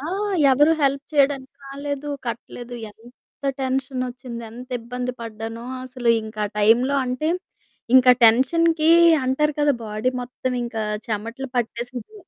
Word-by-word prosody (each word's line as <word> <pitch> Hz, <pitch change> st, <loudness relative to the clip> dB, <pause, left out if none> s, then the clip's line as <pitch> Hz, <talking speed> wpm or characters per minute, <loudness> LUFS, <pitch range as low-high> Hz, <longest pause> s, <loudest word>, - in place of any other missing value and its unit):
ఆ! -, -, -8 dB, 0.5 s
ఎవరు 295 Hz, +5 st, +5 dB
హెల్ప్ 275 Hz, 0 st, +2 dB
చేయడానికి 275 Hz, -2 st, +1 dB
రాలేదు. 285 Hz, +1 st, -5 dB, 0.2 s
కట్టలేదు 240 Hz, +1 st, -6 dB, 0.2 s
ఎంత 240 Hz, +6 st, -20 dB, 0.2 s
టెన్షనొచ్చింది, 255 Hz, -2 st, -3 dB
ఎంత 245 Hz, +3 st, -10 dB
ఇబ్బంది 250 Hz, +2 st, -4 dB
పడ్డానో 225 Hz, +1 st, -6 dB, 0.2 s
అసలింకా 230 Hz, -4 st, -1 dB
ఆ -, -, -10 dB
టైంలో 235 Hz, +6 st, +4 dB
అంటే, 255 Hz, +5 st, -2 dB, 0.7 s
ఇంకా 255 Hz, -1 st, +7 dB
టెన్షన్‌కి 315 Hz, +7 st, +4 dB, 0.3 s
అంటారు 300 Hz, +4 st, +1 dB
కదా 290 Hz, 0 st, +4 dB
బాడీ 215 Hz, +4 st, -1 dB
మొత్తం 255 Hz, +1 st, -4 dB
ఇంకా 225 Hz, -2 st, -4 dB, 0.3 s
చెమటలు 230 Hz, +5 st, -4 dB
పట్టేసింది. 245 Hz, -, -4 dB
250 Hz, 115 wpm, -22 LUFS, 230-275 Hz, 0.7 s, ఇంకా